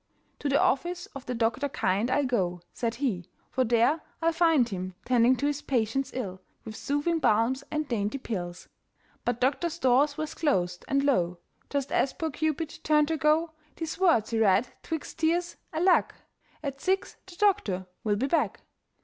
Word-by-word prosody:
"To 290 - -1
the 280 +1 +3
office 350 +6 +1
of 275 - -8
the 250 - -2
doctor 230 +5 0
kind 200 -1 0
I'll 285 +2 +2
go," 180 -8 0
said 230 -1 -2
he, 230 -10 -2 0.2
"for 260 - +2
there 240 +6 +3 0.2
I'll 330 0 +2
find 325 -7 +4
Him 185 -3 -5
tending 245 0 +4
to 280 - -2
his 290 0 0
patients' 255 +1 0
ills 190 -8 -4 0.3
With 220 -1 -7
soothing 290 +6 0
balms 245 +1 +2
and 305 -1 -2
dainty 215 0 -1
pills." 180 -9 -5 0.6
But 245 -1 0
doctor's 295 +6 0
doors 270 +3 +3
were 310 - -1
closed, 180 - -1
and 275 0 +2
lo! 180 -11 +2 0.3
Just 280 -2 -2
as 265 - +2
poor 320 -3 -3
Cupid 315 +2 -2
turned 300 -1 +3
to 320 - 0
go, 310 +2 +2 0.2
These 325 +1 -5
words 325 - +3
he 225 - +1
read 215 +2 +4
'twixt 320 0 -5
tears, 340 +2 +1
alack! 350 +3 +3 0.5
"At 275 -2 -4
six 385 +1 0
the 370 - -12
doctor 345 - +1 0.2
will 210 -2 +2
be 235 +6 0
back." 320 +4 0
270 Hz, 175 wpm, -28 LUFS, 225-315 Hz, 0.6 s, find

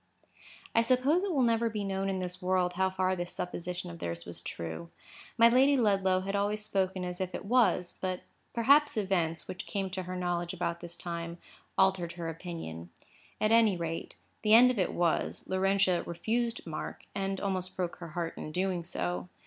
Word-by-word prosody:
I 230 - +5
suppose 255 +8 +3
it 395 -1 -1
will 275 -6 +2
never 230 -1 +2
be 210 -2 -3
known 195 0 -1
in 190 - -1
this 180 0 -4
world 180 -1 +1
how 190 +1 +2
far 185 0 0
this 175 -1 -3
supposition 180 0 -4
of 170 - -10
theirs 85 0 -4
was 85 - -4
true. 85 0 -6 0.5
My 230 - +8
Lady 265 +4 +5
Ludlow 195 -5 +3
had 195 +1 -3
always 210 +1 0
spoken 190 -3 0
as 180 +1 -4
if 185 -1 -2
it - - -6
was; 225 -6 +2
but 185 -1 -2 0.3
perhaps 280 +4 +4
events, 175 -5 0
which 185 - -6
came 195 -2 -2
to 185 +1 -3
her 180 0 -5
knowledge 175 0 -2
about 170 -1 -2
this 175 0 -8
time, 170 -1 -5 0.4
altered 190 -3 +3
her 170 -1 -4
opinion. 160 - -6 0.5
At 215 - +2
any 225 -5 +5
rate, 165 -1 -4 0.3
the 215 0 +6
end 250 +2 +8
of 240 - -3
it 185 - +1
was, 170 -2 0
Laurentia 190 -1 +2
refused 230 +7 -1
Mark, 160 -3 -5
and 195 -1 -2
almost 185 -2 -2
broke 180 -2 -2
her 170 - -7
heart 165 +1 -3
in 155 - -5
doing 180 0 -1
so. 90 - -3
185 Hz, 190 wpm, -31 LUFS, 175-205 Hz, 0.5 s, My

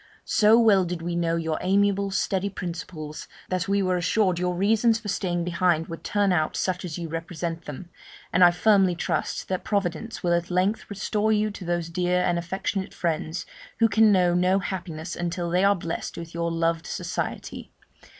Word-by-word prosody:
So 215 +1 +5
well 215 -5 +5
did 175 -1 -4
we 170 0 -2
know 170 -1 +1
your 160 -1 -2
amiable, 200 +1 +2
steady 190 0 0
principles, 170 -4 -6 0.2
that 185 0 -1
we 200 0 +2
were 185 -1 +1
assured 180 0 +1
your 180 0 0
reasons 220 +4 +3
for 215 -2 -7
staying 175 -3 -1
behind 170 -1 +1
would 165 - -7
turn 205 -2 +1
out 155 -3 0
such 185 -1 -1
as 170 -4 -5
you 170 -1 -4
represent 165 +1 -5
them; 160 +4 -8 0.4
and 180 - +5
I 175 - +9
firmly 190 0 +3
trust - - -2
that 185 -1 -2
Providence 200 +3 -2
will 175 -1 +2
at 170 0 0
length 185 +4 0
restore 210 +1 0
you 215 0 +2
to 200 -2 -9
those 175 -1 -1
dear 180 +1 +1
and 175 -1 +1
affectionate 190 +2 -3
friends, 165 0 -2 0.3
who 225 0 +5
can 220 -1 +5
know 180 -3 +4
no 180 +2 +3
happiness 175 -3 -4
until 175 0 -3
they 180 +2 +2
are 200 0 +5
blest 170 -2 -5
with 170 0 -8
your 170 0 -1
loved 165 0 0
society. - - -4
180 Hz, 185 wpm, -25 LUFS, 170-200 Hz, 0.4 s, I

